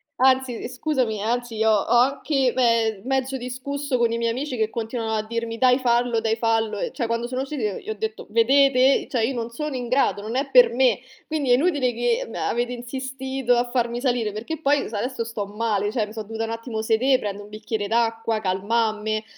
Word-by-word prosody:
anzi, 260 -1 +3
uhm, - - -5
scusami, 255 -5 -1
anzi 230 -1 -1
ho 220 - +4
ho 205 -2 +2
anche 270 0 +2
me 230 -5 +2
mezzo 265 0 -1
discusso 260 +2 -3
con 235 -1 +2
i 230 - -1
miei 230 0 0
amici 260 +1 -3
che 220 0 0
continuavano 225 -1 -2
a 215 - -1
dirmi: 230 0 -3
"Dai, 250 0 +5
fallo, 240 -2 +1
dai, 225 0 0
fallo!". 225 -2 0
Cioè, 245 - -3
quando 230 +1 -2
sono 255 +1 -3
uscita, 275 +1 -5 0.2
gli - - -9
ho 220 - 0
detto: 220 +1 -4
"Vedete, 265 +3 +4
cioè, 235 -4 -1
io 265 - -3
non 235 0 -4
sono 300 +3 -4
in 245 -1 -4
grado, 255 -5 +1
non 225 +3 -5
è 275 +1 -1
per - - +7
me, 255 0 +3 0.3
quindi 295 -5 -1
è - - +8
inutile 275 -4 +2
che, 240 0 0
ehm, 225 - -11
avete 240 +1 -1
insistito 265 +1 -2
a 240 0 0
farmi 240 -1 -1
salire 245 -5 0
perché 235 +10 -5
poi 290 -1 +1
s 220 - -13
adesso 240 +3 -2
sto 225 -3 -4
male, 210 -1 -1
cioè 215 -3 -1
mi 215 - -11
so 220 -1 -5
dovuta 225 +1 -4
n - - -6
attimo 230 -1 -4
sedè, 245 +4 +2
prende 205 0 -5
un 205 - -13
bicchiere 215 -1 -4
d'acqua, 225 0 0
calmamme." 215 +2 0
235 Hz, 210 wpm, -23 LUFS, 220-260 Hz, 0.3 s, è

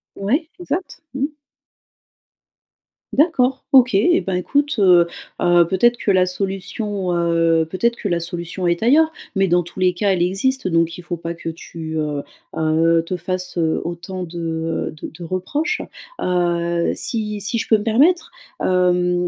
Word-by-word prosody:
Ouais, 275 - -1
exact, 350 +1 -4
mmh. 270 +1 0 1.9
D'accord. 270 -4 +2
OK. 255 -3 +6
Eh, 345 - +4
ben, 190 - -2
écoute, 285 +11 0
heu 180 -3 +6 0.3
heu, 175 -1 +5
peut-être 235 +7 +3
que 205 - 0
la 185 -1 +4
solution, 195 +1 -3
heu, 165 -1 +2
peut-être 235 +7 0
que 205 - -3
la 170 -1 +1
solution 170 +1 -4
est 170 0 0
ailleurs 310 +7 +4 0.2
mais 195 0 +3
dans 175 0 +3
tous 175 +3 -11
les 185 -1 +3
cas, 195 +3 +1
elle 180 -2 +2
existe 205 +8 0
donc 165 -1 +1
il 180 - -10
faut 175 0 -4
pas 165 +1 -5
que 170 -1 -6
tu, 160 -1 -7
heu 150 -2 -2 0.3
heu, 165 +1 +3
te 180 - -3
fasses, 180 +1 -4
heu, 160 -2 +1
autant 175 +2 -5
de, 175 0 -8 0.5
heu, - - -7
de 155 - -8
de 175 - -8
reproches, 285 - -2 0.4
heu, 170 -1 0
si 210 -2 -2
si 210 +4 -1
je 225 - -3
peux 220 - +6
me 205 - -5
permettre, 280 +11 +3 0.3
hem, 180 -1 +2
185 Hz, 165 wpm, -20 LUFS, 170-225 Hz, 1.9 s, OK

